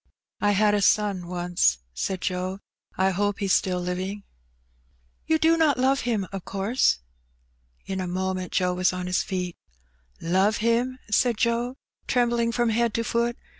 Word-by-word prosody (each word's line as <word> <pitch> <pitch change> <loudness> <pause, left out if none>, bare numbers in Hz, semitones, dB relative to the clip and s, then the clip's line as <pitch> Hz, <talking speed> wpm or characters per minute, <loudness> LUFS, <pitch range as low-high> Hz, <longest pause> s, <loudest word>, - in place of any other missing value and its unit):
"I 205 0 +2
had 205 +1 +3
a 205 - +2
son 200 -3 +2
once,'' 175 - +1 0.2
said 185 - -3
Joe. 185 0 -2 0.4
"I 190 +1 +3
hope 205 +2 0
he's 195 -3 +1
still 180 -1 +1
living." 185 +3 -4 1.0
"You 320 - +3
do 325 +1 +4
not 310 -4 +3
love 265 +2 +2
him, 225 -5 -1
of 195 -2 -6
course?'* 200 - +1 0.9
In 190 -1 -3
a 185 - -3
moment 185 0 -2
Joe 180 -1 +1
was 180 0 +1
on 180 0 -4
his 180 0 +1
feet. 180 -2 -3 0.4
" - - -38
Love 190 +5 +2
him! 235 +3 +1
" - - -19
said 235 +1 +3
Joe, 235 +2 0 0.3
trembling 235 -2 +2
from 240 0 +1
head 230 0 +1
to 230 - 0
foot. 235 +1 0
200 Hz, 170 wpm, -25 LUFS, 185-235 Hz, 1.0 s, do